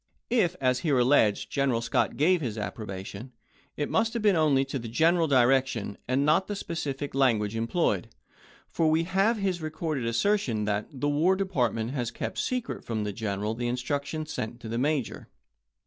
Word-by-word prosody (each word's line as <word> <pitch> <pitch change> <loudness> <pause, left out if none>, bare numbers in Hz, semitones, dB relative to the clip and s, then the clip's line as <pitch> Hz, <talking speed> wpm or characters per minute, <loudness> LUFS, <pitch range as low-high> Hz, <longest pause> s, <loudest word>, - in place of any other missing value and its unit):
If, 190 -8 +2
as 125 -2 +2
here 145 -4 +1
alleged, 120 -5 +3
General 135 -4 +1
Scott 115 0 0
gave 170 +4 +3
his 115 -6 -3
appro 105 +1 -5
bation, 100 +5 -7 0.5
it 145 - -1
must 225 +1 +1
have 230 - -2
been 205 -3 +4
only 145 -4 +3
to 135 0 -4
the 115 - -7
general 165 +8 +3
direc 130 -1 +4
tion 110 -5 -5
and 130 +3 +1
not 155 +5 +3
to 210 - -3
the - - -4
specific 145 -6 -4
language 115 -6 +2
employed, 115 +1 0 0.6
for 160 -1 +1
we 160 +1 +3
have 195 +6 +2
his 190 -4 -1
recorded 155 -5 -3
assertion 115 - +1
that 105 0 -1
"the 145 +1 -2
War 155 +6 +3
Department 125 - -1
has 125 -4 -2
kept 120 - -5
secret 250 -2 -2
from 110 -2 -2
the 105 -1 -3
General 105 0 -2
the 120 +1 -3
instructions 145 +5 -3
sent 110 +2 -4
to 115 - -7
the 115 +1 -2
Major." 145 -2 -1
135 Hz, 185 wpm, -27 LUFS, 115-165 Hz, 0.6 s, been